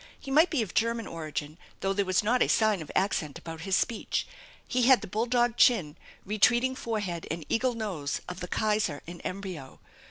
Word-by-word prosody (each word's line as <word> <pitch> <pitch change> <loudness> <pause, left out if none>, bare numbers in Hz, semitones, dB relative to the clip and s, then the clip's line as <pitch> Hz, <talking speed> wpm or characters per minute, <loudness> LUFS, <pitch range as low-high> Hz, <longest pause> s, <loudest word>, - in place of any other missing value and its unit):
He 270 - -8
might 315 +6 +5
be 280 -8 +1
of 195 - -8
German 230 0 +1
origin, 155 -1 -5 0.2
though 195 0 +1
there 200 0 0
was 185 +2 +2
not 245 +4 +2
a - - +5
sign 215 -5 +2
of 155 - -8
accent 160 -7 0
about 165 -1 -8
his 190 +2 0
speech. 230 +2 -1 0.4
He 250 -1 +2
had 260 -2 +7
the - - -6
bull 220 +5 -1
dog 240 -1 +2
chin, 175 -12 +4 0.3
retreating 235 +5 +3
forehead 210 -9 -3
and 160 -1 -4
eagle 250 +1 +1
nose 185 -11 -3
of 180 0 -6
the 180 - -5
Kaiser 210 -8 0
in 175 +1 -9
embryo. 185 -8 -6
205 Hz, 195 wpm, -28 LUFS, 170-235 Hz, 0.4 s, had